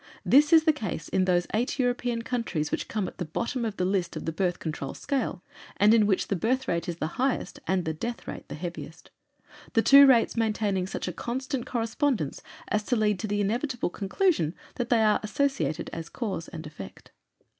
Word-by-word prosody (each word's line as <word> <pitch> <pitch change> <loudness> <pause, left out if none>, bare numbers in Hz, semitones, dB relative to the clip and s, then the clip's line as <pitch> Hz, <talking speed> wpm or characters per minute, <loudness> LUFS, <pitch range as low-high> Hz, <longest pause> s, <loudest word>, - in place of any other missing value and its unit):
This 295 +4 +5
is 325 -1 +7
the 315 -1 +4
case 195 - -5
in 185 -1 +2
those 175 -1 +2
eight 235 +5 0
European 245 -2 0
countries 230 -11 -2
which - - -2
come 210 -4 -2
at - - -10
the - - -1
bottom 235 - -3
of 220 -3 -3
the 180 - 0
list 185 -3 0
of 155 - -5
the 165 - -1
Birth 175 +2 0
Control 155 -4 -5
scale, 265 -9 -2 0.3
and 210 +2 +6
in 215 -3 +5
which 195 -3 +1
the 200 - 0
birth 255 +7 0
rate 170 0 -1
is 170 - -2
the 160 +7 -4
highest 265 0 -1
and 185 -2 +1
the 160 - -1
death 235 +9 -5
rate - - -7
the - - -5
heaviest - - -8 0.6
the 225 - +3
two 280 0 +9
rates 245 -4 +4
maintaining 210 -4 0
such - - -4
a 180 - -3
constant 260 - -3
correspondence 230 - -1 0.3
as 210 - +1
to 250 - +1
lead 210 -3 +1
to 220 - -3
the 205 0 0
inevitable 235 0 -1
conclusion 195 - 0 0.2
that 245 -1 -3
they 230 -3 +4
are 215 -1 +4
associated 210 - -1
as 165 -1 -6
cause 200 -9 -4
and 165 -3 -8
effect. 150 -11 -10
215 Hz, 205 wpm, -27 LUFS, 175-245 Hz, 0.6 s, two